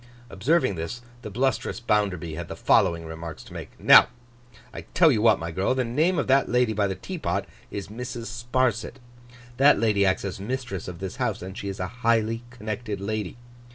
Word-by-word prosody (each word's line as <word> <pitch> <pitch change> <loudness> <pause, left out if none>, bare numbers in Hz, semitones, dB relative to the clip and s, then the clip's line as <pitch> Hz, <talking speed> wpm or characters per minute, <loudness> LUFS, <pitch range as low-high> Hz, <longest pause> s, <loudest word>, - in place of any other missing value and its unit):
Observing 130 - +2
this, 95 +9 -5 0.2
the 105 - -7
blustrous 130 +6 -1
Bounderby 100 -8 0
had 85 +1 -5
the - - -6
following 85 -1 +2
remarks 80 0 -7
to - - -14
make: - - -9
'Now, - - +8 0.7
I - - -6
tell 165 -3 +6
you 110 -5 +1
what, 115 - +5
my 85 +1 -5
girl. 95 +9 0
The 130 - +1
name 155 +10 +1
of 145 - +1
that 135 +1 +3
lady 125 -2 +2
by 105 -1 +1
the 95 - -3
teapot, 185 - -3 0.2
is 100 -1 -6
Mrs. 120 +1 -6
Sparsit. 120 +1 -1 0.6
That 140 -3 +6
lady 105 -3 +2
acts 95 +1 +1
as 95 0 -4
mistress 120 -3 -4
of 90 0 -8
this 95 -1 -5
house, - - -2
and 95 +1 -7
she 100 - -6
is 95 - -6
a 90 - -1 0.2
highly 115 -1 +2
connected 110 -3 -5
lady. 105 +1 -3
110 Hz, 190 wpm, -25 LUFS, 95-125 Hz, 0.7 s, Now